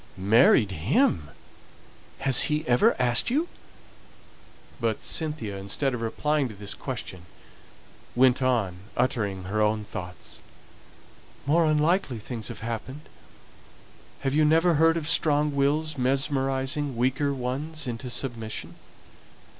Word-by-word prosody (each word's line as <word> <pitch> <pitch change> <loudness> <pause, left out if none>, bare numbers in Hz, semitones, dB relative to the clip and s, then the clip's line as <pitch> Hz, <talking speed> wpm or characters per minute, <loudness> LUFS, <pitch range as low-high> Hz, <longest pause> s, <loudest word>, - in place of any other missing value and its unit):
"Married 105 +2 +4
him! 95 - +1 0.9
Has 135 -2 +6
he 150 +1 -1
ever 120 0 +4
asked 120 - +3
you?" 300 +8 0 1.3
But 115 -3 -2
Cynthia, 150 -11 -2
instead 100 +8 -1
of 120 - -4
replying 145 +5 0
to 110 - -10
this 100 0 -5
question, 95 -9 -7 0.9
went 130 +1 +4
on, 115 -9 0 0.2
uttering 105 -7 -1
her 105 +4 -2
own 105 0 +1
thoughts, 90 -4 -9 1.1
"More 165 +4 +3
unlikely 155 -2 +1
things 110 +1 -6
have - - -7
happened. 115 +5 -5 1.2
Have 135 -1 -1
you 155 +1 +3
never 165 +3 +4
heard 165 +2 +3
of 155 -2 -3
strong 150 -2 +2
wills 145 +1 0
mesmerizing 135 +1 -1
weaker 130 +4 +1
ones 140 +5 -3
into 125 0 -5
submission? 110 - -4
130 Hz, 115 wpm, -26 LUFS, 110-150 Hz, 1.3 s, Has